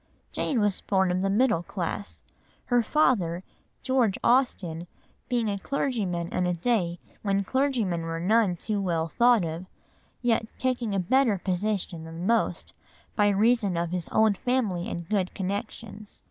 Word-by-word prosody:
Jane 255 Hz, -, -1 dB
was 205 Hz, -2 st, +1 dB
born 190 Hz, -2 st, +1 dB
of 180 Hz, +1 st, 0 dB
the 195 Hz, -, +1 dB
middle 210 Hz, -4 st, +3 dB
class, 180 Hz, +3 st, -5 dB, 0.5 s
her 245 Hz, -, +5 dB
father, 205 Hz, -, +1 dB, 0.4 s
George 255 Hz, -7 st, +2 dB
Austen, 180 Hz, -10 st, +1 dB, 0.4 s
being 240 Hz, -3 st, +1 dB
a 200 Hz, -1 st, -2 dB
clergyman 205 Hz, -10 st, -1 dB
in 180 Hz, -, 0 dB
a 180 Hz, -, 0 dB
day 175 Hz, -3 st, 0 dB, 0.2 s
when 200 Hz, -1 st, +1 dB
clergymen 235 Hz, -8 st, 0 dB
were 165 Hz, 0 st, -4 dB
none 200 Hz, +1 st, +3 dB
too 205 Hz, +3 st, -2 dB
well 165 Hz, -4 st, 0 dB
thought 235 Hz, +2 st, +4 dB
of, 165 Hz, +3 st, -5 dB, 0.6 s
yet 225 Hz, -2 st, +2 dB
taking 245 Hz, -5 st, -1 dB
a -, -, +1 dB
better 230 Hz, +3 st, +3 dB
position 185 Hz, -2 st, -2 dB
than 165 Hz, +2 st, -6 dB
most 230 Hz, +2 st, 0 dB, 0.4 s
by 205 Hz, -1 st, +4 dB
reason 205 Hz, -2 st, +2 dB
of 170 Hz, 0 st, -1 dB
his 180 Hz, -2 st, -3 dB
own 220 Hz, -1 st, +4 dB
family 210 Hz, -4 st, -1 dB
and 170 Hz, -4 st, -5 dB
good 190 Hz, -3 st, -1 dB
connections. 205 Hz, +2 st, -5 dB
200 Hz, 150 wpm, -27 LUFS, 175-230 Hz, 0.6 s, her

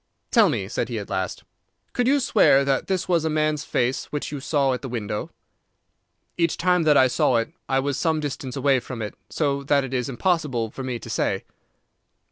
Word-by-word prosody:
"Tell -, -, +6 dB
me," -, -, -2 dB
said -, -, -2 dB
he -, -, -3 dB
at -, -, -6 dB
last, -, -, -3 dB, 0.5 s
"could 245 Hz, 0 st, +1 dB
you 285 Hz, +2 st, +4 dB
swear 140 Hz, -, +4 dB
that 135 Hz, -1 st, 0 dB
this 185 Hz, -2 st, -1 dB
was 170 Hz, -3 st, +2 dB
a 160 Hz, -, 0 dB
man's 155 Hz, -1 st, 0 dB
face 125 Hz, +1 st, 0 dB
which 145 Hz, -1 st, -4 dB
you 145 Hz, -, -4 dB
saw 140 Hz, -1 st, +1 dB
at 125 Hz, -, -4 dB
the 135 Hz, -, -6 dB
window?" 105 Hz, -3 st, -3 dB, 1.1 s
"Each 170 Hz, -1 st, +2 dB
time 180 Hz, 0 st, +2 dB
that 150 Hz, -2 st, +5 dB
I 130 Hz, -, +7 dB
saw 125 Hz, 0 st, +2 dB
it 115 Hz, +8 st, -2 dB, 0.2 s
I 135 Hz, -, +2 dB
was 140 Hz, +1 st, -1 dB
some 160 Hz, -2 st, +1 dB
distance 135 Hz, -3 st, -4 dB
away 135 Hz, -1 st, +3 dB
from 125 Hz, -2 st, -6 dB
it, 105 Hz, -, -5 dB, 0.2 s
so 140 Hz, -3 st, 0 dB
that 140 Hz, 0 st, +3 dB
it 135 Hz, -1 st, -6 dB
is 125 Hz, 0 st, -1 dB
impossible 135 Hz, -, 0 dB
for -, -, -7 dB
me 130 Hz, -2 st, -3 dB
to -, -, -11 dB
say." -, -, -1 dB
140 Hz, 210 wpm, -24 LUFS, 130-155 Hz, 1.1 s, I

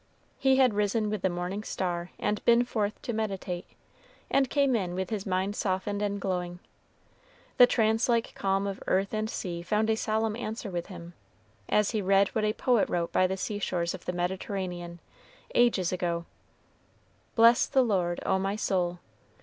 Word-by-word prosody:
He 265 Hz, -1 st, +4 dB
had 260 Hz, -4 st, +4 dB
risen 210 Hz, +1 st, 0 dB
with 215 Hz, -3 st, -2 dB
the 190 Hz, -, +2 dB
morning 180 Hz, +3 st, -3 dB
star 175 Hz, -4 st, -3 dB
and 210 Hz, 0 st, -1 dB
been 235 Hz, +1 st, +5 dB
forth 215 Hz, -4 st, -2 dB
to 240 Hz, -, -3 dB
meditate, 195 Hz, -5 st, -3 dB, 0.6 s
and 270 Hz, -2 st, +3 dB
came 280 Hz, -3 st, +2 dB
in 180 Hz, -5 st, -1 dB
with 190 Hz, +1 st, -3 dB
his 205 Hz, -2 st, -3 dB
mind 190 Hz, +2 st, 0 dB
softened 200 Hz, +1 st, -1 dB
and 205 Hz, -1 st, -1 dB
glowing. 180 Hz, -2 st, -2 dB, 1.0 s
The 245 Hz, -, +9 dB
trance 225 Hz, +1 st, +2 dB
like 235 Hz, -1 st, +1 dB
calm 195 Hz, 0 st, 0 dB
of 195 Hz, -1 st, -4 dB
earth 195 Hz, +2 st, +1 dB
and 215 Hz, 0 st, -1 dB
sea 175 Hz, -5 st, -4 dB
found 215 Hz, +5 st, +1 dB
a -, -, +2 dB
solemn 220 Hz, 0 st, 0 dB
answer 220 Hz, -2 st, -5 dB
with 175 Hz, -1 st, -3 dB
him, 175 Hz, -3 st, -10 dB, 0.6 s
as 210 Hz, -1 st, +3 dB
he 220 Hz, -3 st, -1 dB
read 195 Hz, 0 st, +3 dB
what 215 Hz, -1 st, -1 dB
a 215 Hz, -, +1 dB
poet 245 Hz, -2 st, +2 dB
wrote 170 Hz, -1 st, -1 dB
by 185 Hz, -, +3 dB
the 190 Hz, +1 st, -3 dB
sea 205 Hz, +2 st, -3 dB
shores 170 Hz, -3 st, -1 dB
of -, -, -9 dB
the -, -, -1 dB
Mediterranean, 180 Hz, -1 st, -3 dB, 0.5 s
ages 225 Hz, -7 st, +3 dB
ago: 170 Hz, -2 st, -2 dB, 1.1 s
"Bless 230 Hz, +1 st, +6 dB
the 265 Hz, -2 st, +3 dB
Lord, 180 Hz, -6 st, 0 dB
O 190 Hz, -, +2 dB
my 195 Hz, +1 st, -1 dB
soul. 180 Hz, -4 st, 0 dB
200 Hz, 175 wpm, -28 LUFS, 180-220 Hz, 1.1 s, The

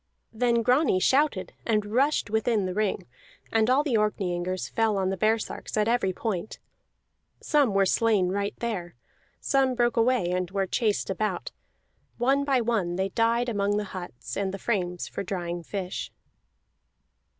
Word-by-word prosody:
Then 235 Hz, 0 st, +2 dB
Grani 250 Hz, -4 st, +3 dB
shouted 265 Hz, -3 st, +2 dB
and 215 Hz, -2 st, +1 dB
rushed 250 Hz, +1 st, +1 dB
within 220 Hz, -2 st, +1 dB
the 185 Hz, -, -2 dB
ring, 205 Hz, -2 st, -1 dB, 0.5 s
and 225 Hz, +1 st, +3 dB
all 265 Hz, +3 st, +4 dB
the 265 Hz, -7 st, +1 dB
Orkneyingers 185 Hz, -3 st, -1 dB
fell 225 Hz, -3 st, +1 dB
on 190 Hz, -1 st, 0 dB
the -, -, -1 dB
baresarks 220 Hz, +2 st, -1 dB
at 210 Hz, 0 st, +2 dB
every 230 Hz, -5 st, +2 dB
point. 195 Hz, 0 st, -4 dB, 0.8 s
Some 280 Hz, -9 st, +2 dB
were 195 Hz, 0 st, +4 dB
slain 205 Hz, -2 st, +2 dB
right 200 Hz, +2 st, -2 dB
there; 195 Hz, -, -4 dB, 0.4 s
some 265 Hz, -2 st, +2 dB
broke 240 Hz, 0 st, +1 dB
away 230 Hz, -6 st, +2 dB
and 180 Hz, -1 st, -1 dB
were 195 Hz, 0 st, 0 dB
chased 210 Hz, 0 st, 0 dB
about; 195 Hz, -1 st, -2 dB, 0.7 s
one 270 Hz, +4 st, +2 dB
by 270 Hz, -3 st, +2 dB
one 215 Hz, -7 st, 0 dB
they 190 Hz, +1 st, -1 dB
died 230 Hz, +3 st, +1 dB
among 205 Hz, -2 st, 0 dB
the 210 Hz, -, 0 dB
huts 125 Hz, -10 st, -7 dB
and 195 Hz, -1 st, -1 dB
the 195 Hz, -, -5 dB
frames 180 Hz, -5 st, -2 dB
for -, -, -5 dB
drying 175 Hz, -2 st, -4 dB
fish. 185 Hz, +2 st, -5 dB
210 Hz, 155 wpm, -27 LUFS, 185-235 Hz, 0.8 s, all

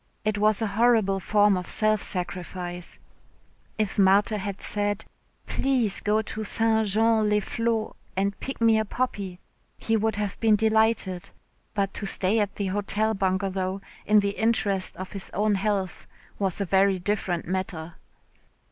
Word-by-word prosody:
It 215 Hz, -1 st, 0 dB
was 215 Hz, +1 st, +2 dB
a 205 Hz, -3 st, -2 dB
horrible 220 Hz, -5 st, +4 dB
form 205 Hz, +1 st, +3 dB
of 180 Hz, -1 st, -4 dB
self 215 Hz, -1 st, +1 dB
sacrifice. 180 Hz, -1 st, -5 dB, 0.8 s
If 210 Hz, -2 st, -1 dB
Marthe 200 Hz, +3 st, +5 dB
had 200 Hz, -1 st, -4 dB
said, 205 Hz, 0 st, -1 dB, 0.4 s
"Please 250 Hz, -7 st, +1 dB
go 215 Hz, +1 st, +1 dB
to 215 Hz, +1 st, -5 dB
St. 220 Hz, 0 st, +1 dB
Jean 220 Hz, +1 st, +3 dB
les 210 Hz, 0 st, +3 dB
Flots 230 Hz, +1 st, -1 dB, 0.2 s
and 200 Hz, +1 st, 0 dB
pick 270 Hz, -, -6 dB
me 225 Hz, -1 st, +4 dB
a -, -, +1 dB
poppy," 200 Hz, -6 st, -3 dB, 0.4 s
he 225 Hz, -, 0 dB
would 220 Hz, 0 st, +1 dB
have 205 Hz, -2 st, -3 dB
been 220 Hz, -2 st, +4 dB
delighted, 220 Hz, -4 st, +1 dB, 0.5 s
but 195 Hz, -1 st, 0 dB
to 200 Hz, -, -4 dB
stay 195 Hz, +3 st, +1 dB
at 205 Hz, -2 st, -1 dB
the 200 Hz, -, -2 dB
Hotel 205 Hz, +3 st, 0 dB
Bungalow 190 Hz, -1 st, -1 dB, 0.3 s
in 210 Hz, 0 st, +6 dB
the 200 Hz, -, 0 dB
interests 205 Hz, -3 st, 0 dB
of 185 Hz, 0 st, -7 dB
his 195 Hz, -1 st, -5 dB
own 210 Hz, +2 st, +2 dB
health 195 Hz, -2 st, -2 dB, 0.3 s
was 195 Hz, -2 st, -1 dB
a 200 Hz, -, 0 dB
very 195 Hz, +1 st, +3 dB
different 185 Hz, -2 st, -2 dB
matter. 175 Hz, -3 st, -3 dB
205 Hz, 155 wpm, -26 LUFS, 190-220 Hz, 0.8 s, in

